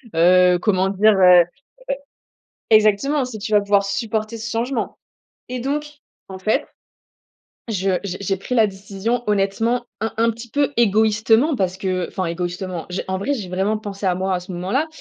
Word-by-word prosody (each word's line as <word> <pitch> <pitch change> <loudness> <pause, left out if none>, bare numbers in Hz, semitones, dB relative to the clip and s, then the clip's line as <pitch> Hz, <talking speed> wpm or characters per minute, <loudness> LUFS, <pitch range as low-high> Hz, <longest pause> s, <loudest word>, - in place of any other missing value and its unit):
heu, 180 +1 +5
comment 190 -1 +1
dire, 210 +2 +4
heu, 180 -2 +7
e - - -13 1.2
exactement! 220 +7 +3
Si 240 -4 -7
tu 215 +2 -5
vas 210 - +5
pouvoir 200 0 +2
supporter 220 +1 -2
ce 225 0 -5
changement 235 +1 -2 0.5
et 250 - -3
donc, 285 +4 -2 0.4
en 190 - -8
fait, 215 +3 0 1.0
je 190 -3 0
j'ai 185 -2 -4
j'ai 195 0 0
pris 250 +6 -4
la 220 -2 +5
décision 200 +5 -3
honnêtement 210 +4 0 0.2
un 225 -1 -2
un 230 +1 +3
petit 235 +1 -10
peu 285 +2 0
égoïstement 220 +5 +3
parce 185 -3 -1
que 185 -2 -2
enfin, 190 -2 -3
égoïstement, 175 0 -4
j'ai 180 - -3
en 190 0 -1
vrai, 270 +9 -1
j'ai 215 -9 -4
vraiment 195 +4 0
pensé 200 -2 -6
à 180 - +2
moi 190 +1 -1
à - - -2
ce 185 - -10
moment-là 195 - -1
205 Hz, 175 wpm, -21 LUFS, 190-230 Hz, 1.2 s, heu